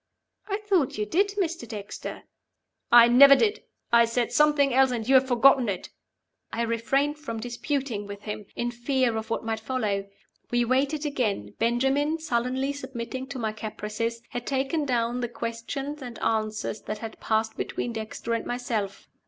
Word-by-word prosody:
'" - - -52
"I 400 -1 -1
thought 365 - +2
you 210 - 0
did, 400 - +1
Mr. 335 - -1
Dexter." 210 -2 -7 0.7
"I 235 0 +9
never 275 +3 +9
did! 435 +6 +1 0.3
I 235 0 +7
said 230 +1 -1
something 295 -3 +4
else, 265 +1 +5
and 235 -3 -3
you 270 - +3
have 260 0 +6
forgotten 255 -1 +5
it." 185 -3 -4 0.6
I 235 - -1
refrained 270 +6 0
from 230 -7 -5
disputing 245 -2 -3
with 200 0 -8
him, 210 -1 -6
in 240 0 -1
fear 245 0 0
of 220 0 -4
what 225 - -2
might 225 -1 -1
follow. 215 -5 -2 0.4
We 240 0 +2
waited 275 +5 +1
again. 215 - -1
Benjamin, 270 +7 +2
sullenly 265 -2 -1
submitting 260 -1 -6
to 275 -1 -6
my 220 -3 -1
caprices, 215 +2 -4
had 245 0 -5
taken 275 +3 0
down 240 -2 0
the 240 - -2
questions 240 +6 -5
and 245 -3 -7
answers 215 -1 -1
that 215 - -5
had 225 0 -8
passed 220 0 0
between 240 - -3
Dexter 220 +1 -4
and 230 - -1
myself. 230 -5 -3
240 Hz, 170 wpm, -26 LUFS, 225-275 Hz, 0.7 s, I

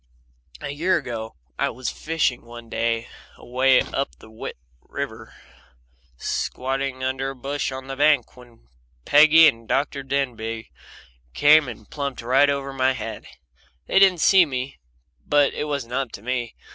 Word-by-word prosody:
A 140 - -4
year 170 +6 +1
ago 115 -2 -6 0.2
I - - +1
was 130 -1 -4
fishing 155 -6 -1
one 120 0 -12
day 115 +1 -1 0.3
away 130 +2 +3
up 135 - -3
the 110 0 -9 0.3
river, - - -6 0.8
squatting 130 - -3
under 130 +1 -1
a 135 - -7
bush 140 +2 -3
on 130 0 -7
a 135 - -5
bank, 145 -3 +2
when 120 - -18 0.4
Peggy 155 +2 +7
and 115 -3 -1
Dr. 140 0 0
Denbigh 115 - -3 0.6
came 150 0 +6
and 110 -3 -9
plumped 140 -4 -5
right 135 +4 +4
over 140 -1 -2
my 130 0 +2
head. - - -7 0.6
They 190 - +3
didn't 190 -4 +5
see 190 +2 +7
me 135 -3 -4 0.4
but 145 -1 +3
it 150 - -3
wasn't 140 -5 -4
up 130 -2 -1
to 100 - -9
me. 120 -1 -3
135 Hz, 145 wpm, -23 LUFS, 120-145 Hz, 0.8 s, Peggy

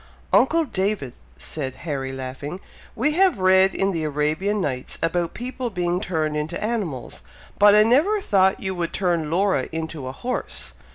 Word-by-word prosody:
"Uncle 325 +4 +4
David!" 195 - -2 0.2
said 135 -4 -5
Harry, 135 -4 -3
laughing, 135 +6 -6 0.4
"we 265 +7 +1
have 365 - +3
read 190 0 +4
in 195 0 +1
the 165 -4 -2
Arabian 155 +8 0
Nights, 130 -8 -3
about 170 0 0
people 250 0 -4
being 180 -2 -1
turned 155 -4 -1
into 155 +5 -3
animals, 205 - -3 0.4
but 205 0 +7
I 210 - +7
never 300 - +3
thought 190 - +3
you 190 0 -2
would 175 -2 -3
turn 170 -5 0
Laura 185 -4 +1
into 160 -4 -5
a - - -3
horse! 250 - -4
180 Hz, 160 wpm, -23 LUFS, 150-210 Hz, 0.4 s, but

